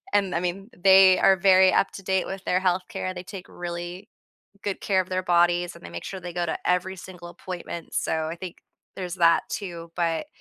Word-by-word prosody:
And, 195 -3 +2
I - - +2
mean, 185 +4 -4
they 190 0 +7
are 195 - +5
very 190 -1 +5
up-to-date 190 -1 0
with 195 0 -7
their 180 - +2
health 185 0 +1
care, 195 -4 -4
they 180 - -6
take 190 -1 -9
really 175 +2 -6 0.6
good 200 -2 -3
care 190 -2 +2
of 185 - -17
their 185 0 -1
bodies, 175 0 +2
and - - -16
they 85 - -8
make 85 0 -7
sure 195 - -6
they 175 -1 -7
go 175 0 -1
to 160 - -2
every 180 +1 0
single 175 -1 -10
appointment, 175 -1 -8
so 160 -1 0
I 165 +2 -5
think 180 0 -8 0.4
there's 180 -1 -5
that, 170 -2 +4
too, 170 -4 -6
but 165 - 0
180 Hz, 210 wpm, -25 LUFS, 175-190 Hz, 0.6 s, they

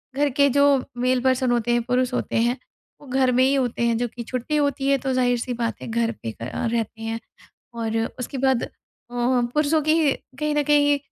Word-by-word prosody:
घर 290 +1 +2
के 280 0 +5
जो 280 0 +4 0.2
मेल 255 0 +2
पर्सन 260 -1 +2
होते 240 -1 +1
हैं, 240 0 +2
पुरुष 250 +1 0
होते - - -2
हैं, 240 +3 +2 0.4
वो 290 - -14
घर 260 0 +2
में 250 +1 +3
ही 265 +1 +3
होते 250 -4 -1
हैं, 235 -1 +2
जो 245 +1 -1
कि 235 +1 -8
छुट्टी 255 +5 -3
होती 285 -2 0
है, 275 - +4
तो 265 0 -2
ज़ाहिर-सी 245 -1 +1
बात 235 -1 -3
है, - - -7
घर 230 0 0
पे 115 - -3
क 115 - -4
अ, - - -2
रहते 225 -1 -2
हैं 225 0 -3 0.5
और 225 -1 -2 0.2
उसके 250 +2 -5
बाद 265 -2 +2
अ, - - -3 0.4
पुरुषों 250 +5 +1
की 310 -1 +3 0.3
कहीं 300 0 0
न 295 - +2
कहीं 290 0 +4
255 Hz, 215 wpm, -23 LUFS, 240-280 Hz, 0.5 s, के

